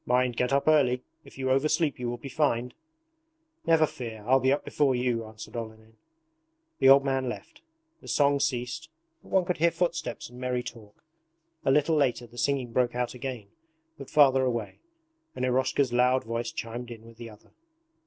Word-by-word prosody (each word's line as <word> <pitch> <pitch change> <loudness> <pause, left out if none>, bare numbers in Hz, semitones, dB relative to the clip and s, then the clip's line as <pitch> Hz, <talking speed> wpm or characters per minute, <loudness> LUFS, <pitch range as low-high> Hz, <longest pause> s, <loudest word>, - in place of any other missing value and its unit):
'Mind, 125 0 +1
get 125 +2 0
up 140 +2 +1
early; 130 -5 +3 0.2
if 140 - -16
you 130 -1 -1
oversleep 150 +2 +1
you 120 -1 -2
will 120 - -4
be 135 - -9
fined!' 125 -4 0 0.9
'Never 160 -1 +5
fear, 115 -6 -8
I'll 130 +3 +4
be 130 +1 +2
up 140 - 0
before 140 -3 +1
you,' 125 -2 -1
answered 110 +1 -11
Olenin. 110 -1 -8 0.8
The 135 - +6
old 140 +1 +7
man 135 -2 0
left. 295 - -9 0.4
The - - -14
song 145 -1 +3
ceased, 130 +5 -2 0.3
but - - -18
one 190 -2 +2
could 180 - -1
hear 170 +2 +4
footsteps 165 -6 -2
and 125 +1 -13
merry 125 -1 -1
talk. 110 -4 -11 0.6
A - - +3
little 150 +4 +3
later 130 -4 +1
the 120 +1 -11
singing 135 -2 0
broke 125 -1 +1
out 125 0 -1
again 125 -5 -6 0.5
but 140 -4 -10
farther 135 -3 +5
away, 120 -4 -2 0.6
and 130 - -1
Eroshka's 130 0 +1
loud 125 +1 +3
voice 115 +1 -3
chimed 120 +1 -6
in 115 -1 -10
with 115 -1 -15
the 115 -1 -8
other. 105 -1 -18
125 Hz, 185 wpm, -27 LUFS, 120-140 Hz, 0.9 s, old